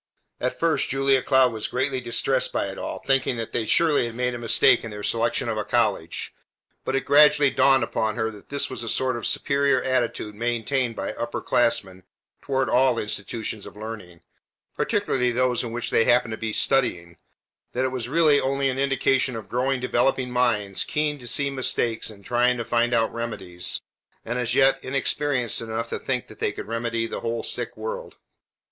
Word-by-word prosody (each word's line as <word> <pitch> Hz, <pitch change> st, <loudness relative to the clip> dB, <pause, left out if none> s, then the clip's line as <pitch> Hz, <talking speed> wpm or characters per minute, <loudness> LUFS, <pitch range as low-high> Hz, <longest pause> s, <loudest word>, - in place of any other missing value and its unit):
At 125 Hz, -, -2 dB
first 165 Hz, -1 st, +1 dB
Julia 135 Hz, -1 st, +2 dB
Cloud 130 Hz, -3 st, +3 dB
was 110 Hz, -1 st, -3 dB
greatly 130 Hz, +1 st, -1 dB
distressed 120 Hz, -1 st, 0 dB
by -, -, -1 dB
it -, -, -7 dB
all, -, -, -5 dB
thinking 135 Hz, -2 st, +1 dB
that 115 Hz, -1 st, -4 dB
they 110 Hz, -2 st, -2 dB
surely 150 Hz, -5 st, +3 dB
had 115 Hz, -, -8 dB
made 125 Hz, 0 st, -1 dB
a 120 Hz, -, -5 dB
mistake 115 Hz, 0 st, +4 dB
in 115 Hz, -, -5 dB
their 105 Hz, -1 st, -8 dB
selection 115 Hz, +3 st, 0 dB
of 110 Hz, -2 st, -2 dB
a -, -, -1 dB
college, -, -, -1 dB, 0.5 s
but -, -, -2 dB
it 135 Hz, -, -1 dB
gradually 145 Hz, -1 st, +6 dB
dawned 135 Hz, -2 st, +4 dB
upon 110 Hz, -1 st, -1 dB
her 110 Hz, -1 st, -1 dB
that 105 Hz, -2 st, -15 dB
this 140 Hz, 0 st, 0 dB
was 130 Hz, -, -6 dB
a 115 Hz, -, -4 dB
sort 130 Hz, +1 st, +1 dB
of 120 Hz, -, -3 dB
superior 140 Hz, -1 st, +1 dB
attitude 120 Hz, -4 st, -1 dB
maintained 120 Hz, +2 st, -1 dB
by 100 Hz, -, -4 dB
upper 120 Hz, 0 st, -4 dB
class 120 Hz, -1 st, +2 dB
men 95 Hz, -1 st, -15 dB, 0.4 s
toward 135 Hz, -1 st, 0 dB
all 125 Hz, +1 st, +3 dB
institutions 105 Hz, 0 st, -4 dB
of -, -, -12 dB
learning, 105 Hz, -6 st, -8 dB, 0.5 s
particularly 125 Hz, -1 st, 0 dB
those 125 Hz, 0 st, +1 dB
in 120 Hz, -, -5 dB
which 120 Hz, +1 st, -3 dB
they 115 Hz, -, +3 dB
happened 120 Hz, -1 st, +3 dB
to -, -, -2 dB
be 110 Hz, -1 st, -3 dB
studying, 90 Hz, -10 st, 0 dB, 0.6 s
that 130 Hz, +1 st, 0 dB
it -, -, +1 dB
was 125 Hz, -2 st, -4 dB
really 155 Hz, -1 st, +4 dB
only 135 Hz, 0 st, 0 dB
an 130 Hz, -, -4 dB
indication 135 Hz, -2 st, +1 dB
of 110 Hz, -3 st, -7 dB
growing 130 Hz, +2 st, 0 dB
developing 125 Hz, +1 st, +1 dB
minds 110 Hz, -6 st, +1 dB
keen 150 Hz, -1 st, -1 dB
to 120 Hz, -, -9 dB
see 140 Hz, +3 st, 0 dB
mistakes 120 Hz, -4 st, -1 dB
and 100 Hz, -3 st, -13 dB
trying 125 Hz, +1 st, +2 dB
to 115 Hz, -, -4 dB
think 120 Hz, 0 st, +1 dB
out 115 Hz, -2 st, +1 dB
remedies, 95 Hz, -7 st, -3 dB, 0.4 s
and 120 Hz, +2 st, -2 dB
as 125 Hz, 0 st, 0 dB
yet 135 Hz, 0 st, +4 dB
inexperienced 135 Hz, -2 st, -1 dB
enough 115 Hz, 0 st, -4 dB
to -, -, -3 dB
think -, -, -2 dB
they -, -, -3 dB
could -, -, -7 dB
remedy 115 Hz, +1 st, -2 dB
the -, -, -5 dB
whole 115 Hz, 0 st, -3 dB
sick 120 Hz, -3 st, -5 dB
world. 110 Hz, 0 st, -6 dB
120 Hz, 190 wpm, -24 LUFS, 115-135 Hz, 0.6 s, gradually